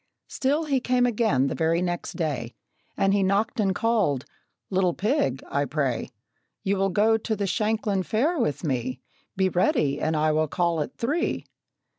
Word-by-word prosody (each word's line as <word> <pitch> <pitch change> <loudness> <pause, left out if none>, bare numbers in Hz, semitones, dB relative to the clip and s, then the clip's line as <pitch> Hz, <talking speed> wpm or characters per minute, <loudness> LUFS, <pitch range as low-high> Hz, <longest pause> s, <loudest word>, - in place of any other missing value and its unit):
Still, 285 +4 0
he 275 -3 +1
came 250 0 +2
again 220 - +2
the 140 - -1
very 165 +1 +1
next 175 -1 -2
day, 145 -9 -3 0.4
And 195 0 +3
he 200 - +3
knocked 200 +5 +1
and 195 -3 +2
called 205 - +1 0.5
"Little 185 -2 +2
pig, 205 - 0
I 145 0 0
pray, 135 -5 -1 0.5
You 200 +1 +1
will 195 0 +2
go 215 +4 +3
to 220 0 -2
the 200 -1 -2
Shanklin 210 0 0
Fair 280 - 0
with 165 - -1
me. 130 -3 -2 0.4
Be 190 0 +3
ready, 150 -5 +1
and 155 0 0
I 155 +1 +2
will 155 +1 +1
call 170 0 0
at 240 - -5
three!" 295 +9 -1
190 Hz, 170 wpm, -25 LUFS, 155-225 Hz, 0.5 s, And